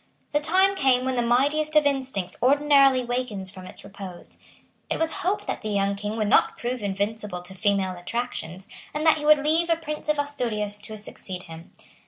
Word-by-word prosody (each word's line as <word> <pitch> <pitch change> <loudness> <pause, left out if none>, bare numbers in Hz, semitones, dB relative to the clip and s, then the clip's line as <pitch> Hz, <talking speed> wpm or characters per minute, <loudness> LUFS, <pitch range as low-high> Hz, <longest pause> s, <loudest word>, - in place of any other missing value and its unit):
The 295 - +2
time 375 +6 +3
came 260 -7 +2
when 260 0 0
the 240 - +1
mightiest 290 +6 +2
of 305 -1 +6
instincts 265 -10 -1
ordinarily 275 -1 +4
wakens 240 -6 -2
from 185 -2 -10
its - - -9
repose. 195 -3 -7 0.5
It - - 0
was 325 0 +1
hoped 385 +4 -1
that - - -3
the 215 - -4
young 200 -1 +1
King 210 +2 -4
would 215 -2 0
not - - +3
prove 245 0 -3
invincible 200 -1 -3
to 185 +2 -7
female 195 -1 0
attractions, 190 -2 -5 0.3
and 305 +1 -1
that 315 -1 +5
he 295 - -5
would 300 -1 +5
leave 330 +3 +2
a 330 - +4
Prince 305 -2 -6
of 300 - +2
Asturias 230 -8 -1
to 215 +1 -7
succeed 190 -3 -5
him. 165 0 -12
245 Hz, 195 wpm, -25 LUFS, 200-295 Hz, 0.5 s, of